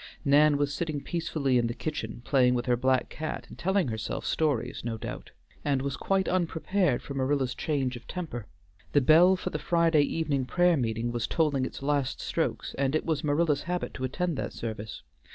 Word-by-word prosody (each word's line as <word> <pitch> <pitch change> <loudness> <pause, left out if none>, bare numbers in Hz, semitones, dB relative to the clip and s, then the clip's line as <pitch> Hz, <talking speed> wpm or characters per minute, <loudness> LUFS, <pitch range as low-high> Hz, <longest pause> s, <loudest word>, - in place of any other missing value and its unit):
Nan 145 +1 +5
was 145 0 0
sitting 155 -2 -2
peacefully 140 -5 0
in 120 - +1
the 120 - -4
kitchen 120 -7 -5
playing 125 -3 +4
with 120 - -1
her 125 - +3
black 130 +1 +2
cat 155 0 -5
and - - -10
telling 190 -4 +1
herself 110 -1 -4
stories 145 -8 0
no 115 -1 -3
doubt, - - -7 0.3
and 140 -2 +1
was 140 -1 -2
quite 195 +3 0
unprepared 180 -3 +1
for 140 - -6
Marilla's 135 -1 0
change 135 -5 -1
of 120 - -11
temper. 150 - -5 0.5
The 145 - +5
bell 170 +7 +6
for 185 - -4
the - - -3
Friday 170 -3 +3
evening 145 -3 0
prayer 175 +5 +3
meeting 115 -3 -1
was 120 -1 -2
tolling 145 -5 +1
its - - -9
last 140 -2 0
strokes - - -2
and 140 +1 +1
it - - 0
was 160 -3 -1
Marilla's 150 0 +2
habit 180 0 -2
to 130 - -6
attend 165 +5 -1
that - - -3
service. 110 -2 -6
145 Hz, 190 wpm, -28 LUFS, 125-160 Hz, 0.5 s, bell